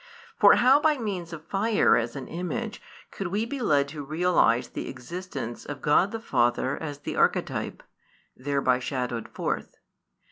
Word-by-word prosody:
For - - +8
how 260 +3 +6
by 300 0 +3
means 190 -8 -4
of 160 -1 -8
fire 205 +5 +3
as 115 0 -1
an 135 -2 -6
image 215 +6 -4 0.3
could 195 - -4
we 205 +5 -1
be 275 +4 -5
led 145 - +2
to 145 0 -6
realise 155 -6 +2
the - - -5
existence 130 -3 -6
of 145 -1 -7
God 150 +6 +4
the 225 - -4
Father 125 - +1
as 145 -3 -6
the 145 - -6
Archetype - - 0 0.5
[thereby 135 -1 +1
shadowed 125 -3 -3
forth]? - - -4
160 Hz, 155 wpm, -26 LUFS, 130-205 Hz, 0.5 s, For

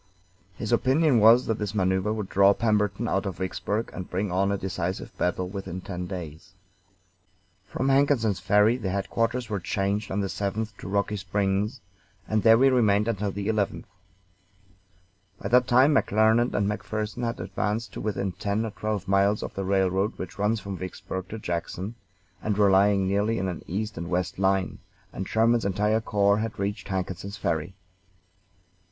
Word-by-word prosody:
His 105 - -4
opinion 130 +2 +3
was 115 +4 +6
that 110 - -1
this 105 0 -3
maneuver 95 +1 +1
would 105 -3 -3
draw 100 +1 +4
Pemberton 105 -1 0
out 100 -1 0
of 95 - -5
Vicksburg 105 +4 -3
and 95 - -7
bring 95 +1 -2
on 95 +2 +1
a 100 - 0
decisive 95 -1 -4
battle 90 +1 -1
within 95 -1 -6
ten 90 -1 -6
days. 90 0 -8 1.1
From 135 - -1
Hankinson's 135 -7 +2
Ferry, 105 +4 +3
the 105 -7 -3
headquarters 115 +5 -1
were 105 -2 -2
changed 100 +3 -1
on 95 - -2
the 100 - 0
7th 100 +2 -3
to - - -9
Rocky 100 +2 0
Springs, 100 +4 -1 0.5
and 110 -1 +1
there 115 +1 +6
we 135 +3 +5
remained 105 -5 +3
until 105 -3 -1
the 100 +1 -4
11th. 105 -3 0 1.6
By 100 - -4
that 125 +2 +4
time 130 +4 +5
McClernand 110 -1 +3
and 100 - +1
McPherson 105 +3 -3
had 115 0 -2
advanced 105 +3 -3
to - - -6
within 100 -2 -2
ten 100 +5 -2
or 110 - -4
twelve 105 -2 -3
miles 100 +2 +2
of - - -6
the 95 - -3
railroad 95 +1 +1
which 95 +1 -7
runs 105 +2 +1
from 100 -2 -6
Vicksburg 95 0 -6
to 110 - -5
Jackson, 90 +2 -4 0.5
and 105 -2 -1
were 100 -2 +5
lying 100 0 +4
nearly 105 +4 +1
in 95 - -1
an 90 -3 -4
east 105 +1 -3
and 85 0 -5
west 90 0 -2
line; 95 -1 +1 0.3
and 95 - -5
Sherman's 115 +1 +2
entire 105 +3 +1
corps 100 -1 +2
had 110 0 -3
reached 100 +2 -3
Hankinson's 95 +1 -4
Ferry. 80 +3 -2
100 Hz, 170 wpm, -26 LUFS, 95-110 Hz, 1.6 s, was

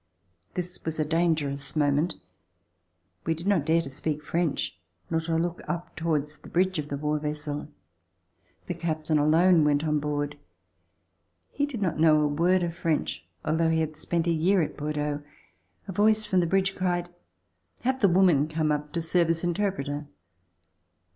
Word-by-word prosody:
This 180 0 -3
was 160 0 -3
a 155 - +2
dangerous 150 -4 0
moment. 150 +3 +2 1.1
We 160 - 0
did 165 +3 -7
not 190 -7 +2
dare 165 +1 +4
to 140 - -6
speak 150 +2 -2
French, 165 - -1 0.4
nor 165 - +1
to 165 0 -2
look 170 +1 -1
up 175 0 -4
towards 155 -2 -1
the - - -13
bridge 185 0 +1
of 150 - -3
the 140 - -3
war 150 +1 -1
vessel. 150 -1 -3 1.0
The 175 - -3
captain 155 -2 -1
alone 165 +3 +5
went 145 0 +2
on 150 -1 +1
board. 145 0 -2 1.1
He 285 0 0
did 240 -8 -4
not 170 -4 -1
know 155 -1 +6
a 150 - +3
word 175 +5 +2
of 170 -1 -2
French 85 - -1 0.2
although 160 +1 +2
he 160 0 +2
had 155 -1 -2
spent 165 +2 -1
a 170 - +2
year 170 +3 +3
at - - -4
Bordeaux. 150 0 -2 0.7
A - - -4
voice 215 +3 +3
from 185 - +2
the 175 - +2
bridge 190 +2 +2
cried: 175 -1 -1 0.7
"Have 260 +1 0
the 200 - +6
woman 175 -5 +4
come 155 -1 0
up 150 0 -2
to 170 - -1
serve 170 +1 +2
as 165 0 +1
interpreter." 165 -6 -1
160 Hz, 170 wpm, -27 LUFS, 150-175 Hz, 1.1 s, know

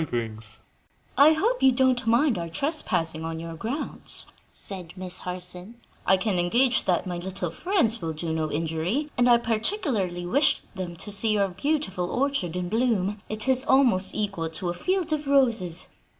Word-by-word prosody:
"I 290 +4 +7
hope 455 +11 0
you 265 - +6
don't 255 -1 +2
mind 235 - +3
our 170 -1 -4
trespassing 165 - +1
on 165 0 -4
your 165 0 -6
grounds?" 230 - -3 0.3
said 185 -5 -7
Miss 185 -1 -7
Harson. 180 +3 -7 0.3
"I 190 - +5
can 190 -1 0
engage 240 +9 +2
that 180 -2 +1
my 175 -2 -4
little 185 -1 -3
friends 275 - +1
will 165 -1 -2
do 160 +1 -4
no 155 -1 -2
injury, 165 - -2
and 245 0 +3
I 240 - +7
particularly 225 - 0
wished 275 +3 +1
them 180 -2 -5
to 205 +5 -5
see 215 +2 +2
your 200 -2 +2
beautiful 190 - -1
orchard 260 - -1
in 180 0 -2
bloom; 210 -2 0
it 215 +3 -1
is 260 0 +5
almost 245 -9 +3
equal 195 -6 -2
to 170 +2 -4
a - - -1
field 365 - -1
of 300 -1 -3
roses." 230 -11 +2
200 Hz, 165 wpm, -26 LUFS, 175-260 Hz, 0.3 s, I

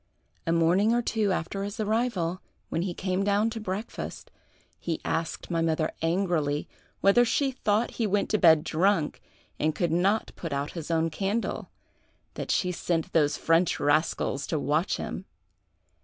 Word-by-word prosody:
A - - +2
morning 175 +7 +3
or 240 - +1
two 215 -3 +1
after 185 +3 -2
his 205 +3 -5
arrival, 210 -5 0 0.3
when 165 - -1
he 180 0 -1
came 185 0 -1
down 205 +3 +2
to 225 - -5
breakfast, 210 +1 -5 0.5
he 165 -2 -3
asked 165 +2 -2
my 165 -1 +1
mother 160 -1 +1
angrily 165 -4 0 0.3
whether 200 +5 +6
she 270 +3 +1
thought 225 -3 0
he 220 - +2
went 205 0 +1
to 215 - +2
bed 160 -4 +6
drunk 175 -1 +1 0.4
and 155 0 +1
could 175 -3 0
not 195 +6 +1
put 165 -4 -5
out 140 +1 -2
his 165 -3 -7
own 165 0 +1
candle, 200 +7 -2 0.6
that - - -6
she 180 - +1
sent 170 0 -2
those 150 -2 +3
French 165 +1 +2
rascals 145 -2 +1
to 160 - -1
watch 150 +5 0
him. 190 - -5
180 Hz, 160 wpm, -27 LUFS, 165-205 Hz, 0.6 s, whether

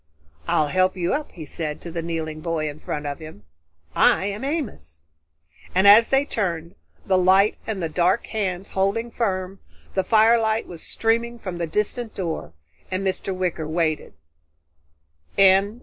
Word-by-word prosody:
"I'll 150 -1 +2
help 185 +3 +2
you 175 -1 0
up," 300 +1 -3
he 160 -3 -8
said 150 0 -4
to 170 - -7
the 165 0 -3
kneeling 160 -2 -4
boy 160 -2 -1
in 145 0 -6
front 150 -1 -4
of 145 -1 -4
him. 155 -10 -11 0.5
"I - - +4
am 205 +4 -4
Amos." 205 - -4 0.7
And 190 +2 +5
as 215 +3 +8
they 270 +1 +3
turned, 170 - -2 0.3
the 185 -1 +3
light 190 +3 +4
and 205 -5 -3
the - - +1
dark 175 +6 +1
hands 195 -4 -3
holding 200 +5 0
firm, 190 -4 -2 0.3
the 190 - +1
firelight 220 0 +3
was 170 -2 -9
streaming 235 +1 0
from 185 -6 -6
the 170 - -1
distant 215 +6 -2
door 165 - -4 0.4
and 185 +1 -2
Mr. 190 +1 -2
Wicker 180 -4 -2
waited. 155 -1 -1
185 Hz, 155 wpm, -23 LUFS, 165-215 Hz, 0.7 s, as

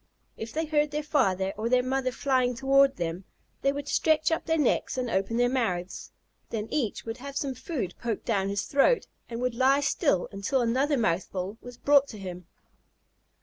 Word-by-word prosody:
If 220 0 -7
they 320 +1 -1
heard 300 -1 +1
their 300 +1 -3
father 195 - +1
or 225 +2 -1
their 250 0 +3
mother 260 0 0
flying 255 -2 +1
toward 275 +1 +4
them, 170 -2 -3 0.4
they 275 - +3
would 285 0 -5
stretch 315 +1 +2
up 325 - -1
their 325 0 +2
necks 285 -2 +1
and 250 -2 -2
open 195 +4 0
their 245 0 +4
mouths. 190 -9 -2 0.4
Then 220 -1 -3
each 245 -9 -1
would 225 +1 -5
have 275 +2 -7
some 275 -2 -1
food 250 - -4
poked 230 -3 -3
down 195 -4 0
his 200 +1 -1
throat, 285 - +3 0.2
and 230 -1 -5
would 250 -1 0
lie 265 +4 +3
still 280 - +1
until 225 +7 0
another 270 +5 +1
mouthful 190 0 -1
was 245 -1 -10
brought 285 0 +4
to 220 - -9
him. 180 -3 -8
250 Hz, 190 wpm, -27 LUFS, 205-280 Hz, 0.4 s, toward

